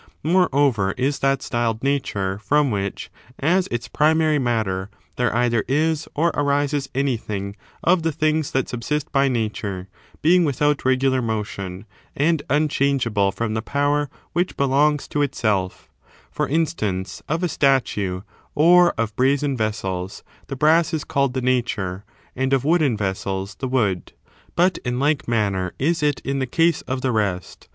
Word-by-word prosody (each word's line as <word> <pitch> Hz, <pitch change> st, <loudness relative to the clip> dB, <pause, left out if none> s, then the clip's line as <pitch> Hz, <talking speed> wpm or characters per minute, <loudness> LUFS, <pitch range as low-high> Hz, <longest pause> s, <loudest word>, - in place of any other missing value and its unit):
Moreover, 140 Hz, -, +2 dB
is 140 Hz, +2 st, 0 dB
that 135 Hz, 0 st, +1 dB
styled 120 Hz, -2 st, -1 dB
Nature 105 Hz, -9 st, -1 dB
from 140 Hz, +6 st, +2 dB
which, 100 Hz, -1 st, -3 dB, 0.3 s
as 175 Hz, +6 st, +2 dB
its 120 Hz, 0 st, -3 dB
primary 155 Hz, +2 st, +2 dB
matter, 110 Hz, -6 st, -1 dB, 0.3 s
there 125 Hz, -2 st, +1 dB
either 120 Hz, -2 st, +2 dB
is 155 Hz, +3 st, 0 dB
or 165 Hz, +3 st, +2 dB
arises 145 Hz, -1 st, 0 dB
anything 110 Hz, -7 st, -2 dB, 0.3 s
of 175 Hz, 0 st, +3 dB
the 165 Hz, 0 st, 0 dB
things 155 Hz, 0 st, 0 dB
that 130 Hz, -1 st, -1 dB
subsist 140 Hz, +5 st, -3 dB
by 140 Hz, -1 st, +3 dB
Nature, 105 Hz, -6 st, -3 dB, 0.3 s
being 175 Hz, +3 st, +5 dB
without 145 Hz, -1 st, +1 dB
regular 130 Hz, 0 st, +2 dB
motion,^ 105 Hz, -4 st, -4 dB, 0.3 s
and 155 Hz, +1 st, +2 dB
un 150 Hz, +3 st, +3 dB
changeable 125 Hz, -9 st, +1 dB
from 115 Hz, +1 st, -3 dB
the 110 Hz, -, -1 dB
power 145 Hz, +3 st, 0 dB, 0.2 s
which 175 Hz, +2 st, -1 dB
belongs 140 Hz, +2 st, +2 dB
to 145 Hz, -, -1 dB
itself; 105 Hz, -9 st, -1 dB, 0.4 s
for -, -, -1 dB
instance, 120 Hz, -, -1 dB
of 160 Hz, +4 st, -1 dB
a -, -, +3 dB
statue, 120 Hz, -, +1 dB, 0.3 s
or 175 Hz, +3 st, +6 dB
of 110 Hz, -2 st, -2 dB
brazen 140 Hz, +2 st, +1 dB
vessels, 95 Hz, -5 st, -3 dB, 0.2 s
the 135 Hz, -, -5 dB
brass 160 Hz, +4 st, +3 dB
is 155 Hz, -, -3 dB
called 140 Hz, -4 st, 0 dB
the 130 Hz, -, 0 dB
nature, 110 Hz, -7 st, -1 dB, 0.3 s
and 130 Hz, +1 st, 0 dB
of 135 Hz, 0 st, +1 dB
wooden 155 Hz, -7 st, +2 dB
vessels 95 Hz, -1 st, -3 dB
the 130 Hz, -, -5 dB
wood: 105 Hz, -8 st, -1 dB, 0.4 s
but 180 Hz, +2 st, +2 dB
in 125 Hz, 0 st, -3 dB
like 145 Hz, 0 st, +1 dB
manner 100 Hz, -6 st, 0 dB
is 160 Hz, +4 st, 0 dB
it 145 Hz, -2 st, +1 dB
in 140 Hz, 0 st, -2 dB
the 130 Hz, -, -1 dB
case 165 Hz, +5 st, +2 dB
of 130 Hz, 0 st, -2 dB
the 130 Hz, -, 0 dB
rest. 95 Hz, -, -2 dB
130 Hz, 155 wpm, -22 LUFS, 110-150 Hz, 0.4 s, or